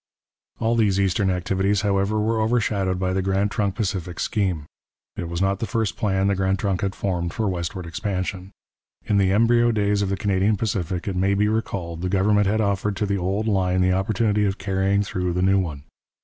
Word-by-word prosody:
All 115 +1 +1
these 105 -4 +2
eastern 95 0 +1
activities, 95 +2 0
however, 100 +1 +1
were 110 +1 +1
overshadowed 105 -5 +1
by 95 0 -1
the 95 - 0
Grand 95 +2 0
Trunk 100 -3 -1
Pacific 95 -5 -3
scheme. 90 -8 -1 0.5
It 85 - -5
was 85 +2 -1
not 100 0 +1
the 115 - -2
first 115 -4 -1
plan 95 -3 0
the 100 - +2
Grand 95 0 0
Trunk 95 -1 -1
had 95 -1 -2
formed 85 -3 -2
for 110 -2 0
westward 90 -1 -3
expansion. 95 +1 -3 0.6
In 100 - +2
the 95 -1 +3
embryo 120 +3 +4
days 105 -2 +1
of 100 - 0
the 100 - -1
Canadian 100 +1 +1
Pacific, 95 -4 -2
it 95 - -2
may 95 +2 +2
be 105 +1 +2
recalled, 90 -6 -3
the 90 - -1
government 100 +1 +3
had 110 +2 +1
offered 100 0 0
to 105 - -1
the 100 -1 -1
old 100 +5 -1
line 95 -3 +1
the 90 0 +3
opportunity 105 +2 +1
of 100 -1 0
carrying 95 0 +1
through 90 -3 -2
the 90 +1 0
new 95 +1 +4
one. 75 -7 -4
95 Hz, 205 wpm, -23 LUFS, 95-105 Hz, 0.6 s, embryo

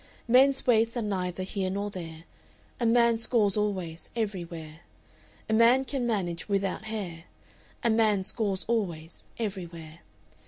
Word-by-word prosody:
"Men's 265 +3 +5
waists 230 0 +3
are 235 - -1
neither 185 -3 -2
here 190 0 -2
nor 200 +2 -2
there; 165 -4 -8 0.6
A 235 - +2
man 235 0 +4
scores 225 -4 +2
always, 185 -6 -2
everywhere. 170 -8 -4 0.7
"A 220 - -1
man 235 +4 +5
can 260 -3 -2
manage 185 -5 -2
without 200 +1 -1
hair; 185 -7 -5 0.6
A 235 - +3
man 215 -3 +3
scores 195 -1 -1
always, 175 -8 -2
everywhere. 170 -7 -6
205 Hz, 130 wpm, -28 LUFS, 175-230 Hz, 0.7 s, Men's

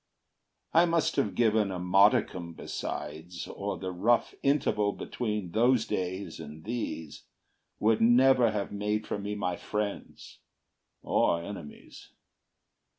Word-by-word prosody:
I 170 +2 +6
must 165 -1 +1
have 105 - 0
given 110 -3 +3
a 95 - -4
modicum 90 -2 +3
besides, 80 +2 -6
Or - - -4
the 95 - -4
rough 110 +7 +2
interval 105 -7 +1
between 105 -7 -4
those 120 +2 +3
days 95 +2 -3
And 75 +2 -9
these 105 -10 -5 0.5
would 110 +1 +2
never 125 +1 +5
have 105 -2 -3
made 105 +1 -1
for - - -3
me 105 +1 -4
my 90 -3 -2
friends, 105 -1 -5 0.6
Or 85 0 +2
enemies. 85 -6 -10
105 Hz, 120 wpm, -29 LUFS, 90-115 Hz, 0.6 s, I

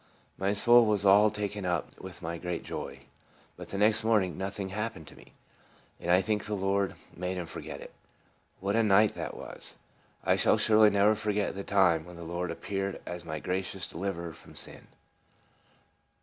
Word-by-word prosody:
My 100 +1 0
soul 120 +2 +6
was 105 -2 +2
all 100 +2 +7
taken 105 -1 -4
up 90 -2 -2
with 90 -1 -10
my 85 +1 -4
great 90 -1 -4
joy. - - -6 0.5
But - - -10
the 100 - -4
next 110 +2 +3
morning 105 -5 +2
nothing 95 0 -4
happened 105 -4 -4
to - - -15
me, - - -17 0.7
and 85 - -5
I 90 +2 +6
think 105 +1 0
the 105 - -2
Lord 100 0 0 0.2
made 90 +1 -3
him 90 - -3
forget - - -7
it. - - -11 0.7
What 100 +2 -1
a 115 - +4
night 105 0 +5
that - - -5
was! - - -7 0.5
I - - +3
shall - - +4
surely 110 -1 +6
never 100 +1 +4
forget 105 -1 -1
the 100 - -5
time 90 -6 +3
when 90 0 -11
the 85 - -9
Lord 85 +2 -3
appeared 95 -1 -3
as 90 -1 -6
my 80 -1 -4
gracious 90 +2 -3
Deliverer 85 -2 -4
from - - -15
sin. - - -5
95 Hz, 180 wpm, -29 LUFS, 90-105 Hz, 0.7 s, all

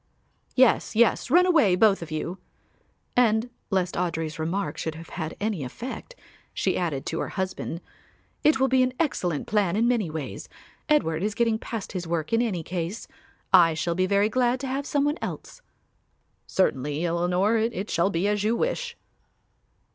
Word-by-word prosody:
"Yes, 255 -3 +3
yes, 235 +2 +3
run 350 +6 +6
away, 310 - +4
both 200 0 +4
of 165 - -7
you"; 165 +4 -4 0.8
and, 235 0 +3 0.2
lest 185 -2 0
Audry's 160 -3 -2
remark 180 +5 -2
should 160 -1 -3
have 165 +1 -10
had 160 -2 -5
any 205 -7 -1
effect, 250 - -7 0.4
she - - 0
added, 160 -7 -2
to 165 - -3
her - - -2
husband; 185 -3 -4 0.6
"It 305 -3 +4
will 265 - +4
be 260 -1 +3
an 255 0 +1
excellent 180 - -1
plan 200 -4 +1
in 230 +3 +2
many 230 -8 +1
ways. 155 -3 -6 0.4
Edward 165 - +2
is 210 +2 -1
getting 230 -2 +1
past 225 -3 -5
his 180 -3 -4
work 165 +2 -2
in 230 - +4
any 195 -9 -1
case. 175 +5 -4 0.5
I 170 -3 +7
shall 170 +2 -1
be 185 +2 +1
very 200 +1 +3
glad 250 +2 +1
to 270 - -3
have 275 +2 -3
some 285 -1 +1
one 295 +2 0
else." - - -6 0.9
"Certainly, 150 -3 0
Eleanor, 180 +6 +1
it 220 -2 -2
shall 170 +3 +2
be 180 +1 0
as 205 -1 0
you 220 +2 +2
wish." 485 - -2
200 Hz, 170 wpm, -26 LUFS, 170-240 Hz, 0.9 s, I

